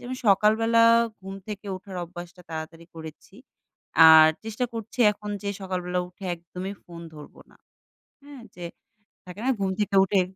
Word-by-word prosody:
যে - - -13
আমি 255 0 -5
সকালবেলা 220 +3 +4 0.4
ঘুম 195 0 -8
থেকে 205 -1 -7
ওঠার 185 0 -10
অভ্যাসটা 175 +1 -11
তাড়াতাড়ি 160 +1 -7
করেছি 160 +2 -11 0.7
আর 160 0 +9 0.2
চেষ্টা 225 +3 -3
করছি 225 +2 -8
এখন 210 0 -8
যে 200 - -3
সকালবেলা 180 -1 -3
উঠে 185 +2 -14
একদমই 180 +3 -8
phone 170 -1 -11
ধরবো 150 -1 -13
না। - - -22 0.7
হ্যাঁ? 280 -3 -12
যে 175 - -9 0.6
থাকে 180 +3 -10
না - - +3
ঘুম 195 -1 -1
থেকে 205 -1 0
উঠে 195 0 +2
190 Hz, 155 wpm, -25 LUFS, 175-210 Hz, 0.7 s, আর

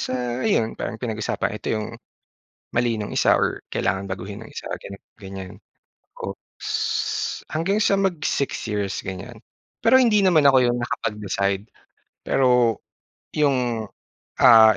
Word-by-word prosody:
sa 125 -1 -2
ayun, 115 - +2
parang - - -5
pinag-usapan, 110 -2 -2
ito - - -5
'yong 110 - -3 0.9
mali 120 -1 +2
nung 105 - -4
isa - - +4
or - - -1
kailangan 95 +1 0
baguhin 100 +3 -6
nung 115 - -13
isa, - - -7 0.2
ganito, 100 0 -9
ganyan. 95 -2 -8 0.7
Oops! - - -7 0.8
Hanggang 190 +7 0
sa 200 -1 +3
mag-six 175 -7 -1
years 100 -2 -2
ganyan, 100 +5 -7 0.4
pero 245 +3 +6
hindi 230 -5 +5
naman 175 -6 +4
ako 135 -2 +7
'yon 120 0 +2
nakapag-decide. 100 -4 -2 0.6
Pero, 125 -4 +3 0.6
'yong, 125 -6 +1 0.6
ah, 110 -3 +9
120 Hz, 125 wpm, -23 LUFS, 105-140 Hz, 0.9 s, ah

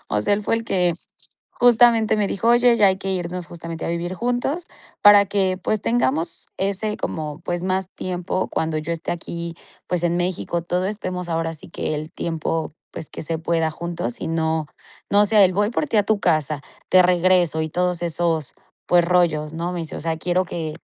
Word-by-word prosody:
O 105 - 0
sea, - - +1
él 205 - -2
fue - - +1
el 230 - -4
que 180 -5 +2 0.6
justamente 235 -2 +5
me 210 -1 +1
dijo: 225 +4 -1
"Oye, 240 0 +5
ya 210 -3 +5
hay 190 - +1
que 195 - -4
irnos 180 -1 -3
justamente 165 -1 -7
a - - -2
vivir 170 +2 -2
juntos 245 - -1 0.4
para 205 -1 +8
que, 190 -2 +1
pues 210 +2 -1
tengamos 130 +8 0
ese 200 +2 -1
como 155 0 -4
pues 175 0 -3
más 185 0 -1
tiempo 180 0 -3
cuando 160 -1 -1
yo 160 +2 -3
esté 165 0 -3
aquí, 170 0 -6 0.3
pues, 175 -1 0
en 170 0 +1
México, 175 -1 -1
todo 180 +2 -1
estemos 185 -4 -4
ahora 165 0 -1
sí 155 - -10
que - - -3
el 155 +1 -5
tiempo, 165 -1 -2 0.2
pues, 155 - -7
que - - -7
se 160 +1 -2
pueda 165 -1 0
juntos. 170 +8 -5
"Y - - -3
no, 160 -1 0 0.4
no 205 +1 +5
sea 210 -1 +5
el 185 - +3
"voy 205 +3 +2
por 300 +5 -1
ti 225 - 0
a - - +5
tu 210 0 +1
casa, 155 -3 +1 0.3
te 185 - +7
regreso", 175 -2 +3
y 155 - -2
todos 180 0 0
esos, 165 -3 -1 0.3
pues, 175 -1 +4
rollos, 165 -3 +2
¿no? 170 +2 -3
me 180 - -4
dice: 160 - -6
"O - - -6
sea, 165 +1 -1
quiero 180 +2 +1
que, 160 -3 -4
175 Hz, 205 wpm, -22 LUFS, 165-195 Hz, 0.6 s, para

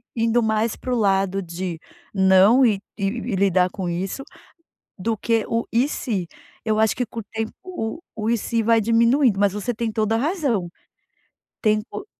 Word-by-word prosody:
indo 230 +1 +2
mais 220 0 0
para 255 - -3
o - - +1
lado 195 -2 +1
de 175 0 -5 0.4
não, 190 +6 +5
e 210 -4 +2 0.2
e 200 - -1
e 235 +1 -3
lidar 185 -1 +3
com 185 -2 -4
isso, 185 +9 -3 0.8
do 225 +4 -1
que 225 +1 0
o 230 0 0
"e 245 +5 +3
se", 205 - -2 0.4
eu 215 -1 +1
acho 220 - +2
que 250 - -1
com 230 +1 -6
o - - -7
tempo 220 0 -3
o 325 -7 -5 0.2
o 215 0 -2
"e 235 - +3
se" 230 +1 -1
vai 230 +1 +4
diminuindo 230 +1 +3
mas 200 -2 +3
você 210 +4 -2
tem 225 0 -3
toda 220 +1 +1
a - - 0
razão, 270 - 0 0.9
tempo 215 - -1
220 Hz, 180 wpm, -22 LUFS, 195-235 Hz, 0.9 s, não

